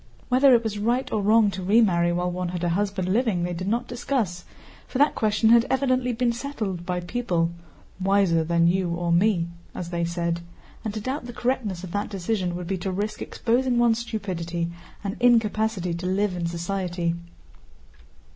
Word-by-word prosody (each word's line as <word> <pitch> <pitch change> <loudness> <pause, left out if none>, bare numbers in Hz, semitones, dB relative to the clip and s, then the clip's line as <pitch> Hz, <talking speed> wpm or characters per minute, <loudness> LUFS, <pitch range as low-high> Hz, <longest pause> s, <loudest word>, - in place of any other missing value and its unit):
Whether 255 +1 +6
it 235 - +2
was 210 -2 -3
right 240 +5 0
or 215 - 0
wrong 215 0 +4
to 190 - -5
remarry 180 -4 +3
while 180 +1 0
one 180 0 -3
had 180 0 -4
a 175 - +2
husband 195 +1 -1
living 220 -7 +1
they 175 0 -2
did 185 +2 -4
not 235 +4 0
discuss, 235 -8 -2 0.4
for - - -4
that 290 +3 +4
question 220 +1 +2
had 235 0 +6
evidently 255 -2 +1
been 240 0 +1
settled 215 -9 -4
by 180 -1 -1
people 175 -4 -1 0.5
"wiser 190 -4 +3
than 170 +1 +2
you 180 +1 +2
or 170 0 -1
me," 175 -1 +3 0.3
as 175 -1 -5
they 170 -1 -1
said, 170 0 -1 0.4
and 220 - -2
to 215 - -3
doubt 260 +4 -3
the 240 - -7
correctness 225 -8 -2
of 185 - -7
that 205 +2 -2
decision 190 -2 -2
would 180 0 -5
be 185 +1 -2
to 190 +2 -2
risk 205 +3 -3
exposing 245 +1 0
one's 235 -1 +3
stupidity 175 -7 -3 0.3
and 200 +2 -3
incapacity 220 -6 +2
to 175 +2 -4
live 190 0 +1
in 170 -1 -2
society. 175 0 -2
195 Hz, 185 wpm, -25 LUFS, 175-230 Hz, 0.5 s, Whether